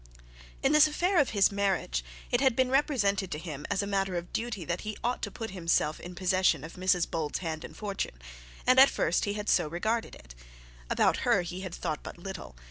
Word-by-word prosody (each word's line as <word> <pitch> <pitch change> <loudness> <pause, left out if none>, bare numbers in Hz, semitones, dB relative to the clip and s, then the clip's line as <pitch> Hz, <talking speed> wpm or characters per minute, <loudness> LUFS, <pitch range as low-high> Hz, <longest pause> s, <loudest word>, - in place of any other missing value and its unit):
In 270 - +4
this 305 0 +7
affair 350 +4 +1
of 280 - +3
his 200 -2 +3
marriage, 195 - 0 0.3
it 245 - +2
had 265 -4 +4
been 255 0 +2
represented 210 - +1
to - - -3
him 155 -3 -7
as 200 0 0
a - - -2
matter 195 -2 -1
of 175 0 -5
duty 220 -6 -3
that 170 +2 -2
he 215 -1 -5
ought 245 +2 -1
to - - -2
put 225 -3 -6
himself 165 -4 0
in 180 0 -9
possession 185 -4 +2
of 160 - -8
Mrs 185 -1 +1
Bold's 155 -3 -2
hand 160 -3 -4
and - - -10
fortune; 200 - -4 0.5
and 255 +1 +6
at 270 - +9
first 170 - +1
he 205 - -1
had 210 0 -5
so - - +3
regarded 215 +8 -2
it. - - -14 0.6
About - - +3
her - - +2
he 180 +2 -6
had 185 -2 -6
thought 155 -3 -3
but - - -9
little. 190 - -8
195 Hz, 215 wpm, -29 LUFS, 170-225 Hz, 0.6 s, at